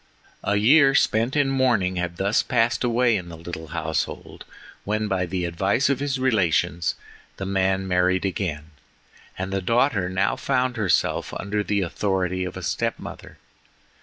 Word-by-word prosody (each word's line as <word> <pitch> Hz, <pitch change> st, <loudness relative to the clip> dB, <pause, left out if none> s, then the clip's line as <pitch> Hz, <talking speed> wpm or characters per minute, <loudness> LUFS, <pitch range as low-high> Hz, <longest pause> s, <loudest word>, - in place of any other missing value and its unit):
A 100 Hz, -, +1 dB
year 135 Hz, +6 st, +5 dB
spent 115 Hz, +1 st, +2 dB
in 145 Hz, -2 st, +2 dB
mourning 120 Hz, -9 st, +1 dB
had 85 Hz, -1 st, -3 dB
thus 100 Hz, +4 st, +2 dB
passed 120 Hz, +2 st, +1 dB
away 120 Hz, -1 st, +2 dB
in 90 Hz, -3 st, -4 dB
the 85 Hz, -, -9 dB
little 80 Hz, -1 st, -7 dB
household, 80 Hz, +1 st, -4 dB, 0.4 s
when, 110 Hz, +1 st, -1 dB
by 95 Hz, -3 st, -1 dB
the 90 Hz, 0 st, -2 dB
advice 95 Hz, +10 st, +1 dB
of 135 Hz, -, 0 dB
his 140 Hz, -1 st, -1 dB
relations, 95 Hz, -8 st, +1 dB, 0.4 s
the 95 Hz, -, -4 dB
man 95 Hz, 0 st, 0 dB
married 90 Hz, +1 st, +2 dB
again, 80 Hz, -5 st, -3 dB, 0.7 s
and 95 Hz, +1 st, -4 dB
the 95 Hz, -, 0 dB
daughter 115 Hz, -2 st, +1 dB
now 95 Hz, +2 st, +1 dB
found 130 Hz, -2 st, 0 dB
herself 110 Hz, -6 st, 0 dB
under 105 Hz, +1 st, -2 dB
the 100 Hz, -1 st, 0 dB
authority 95 Hz, 0 st, -1 dB
of 90 Hz, +1 st, -6 dB
a 95 Hz, -, -7 dB
step -, -, -1 dB
mother. -, -, -10 dB
95 Hz, 160 wpm, -24 LUFS, 90-120 Hz, 0.7 s, year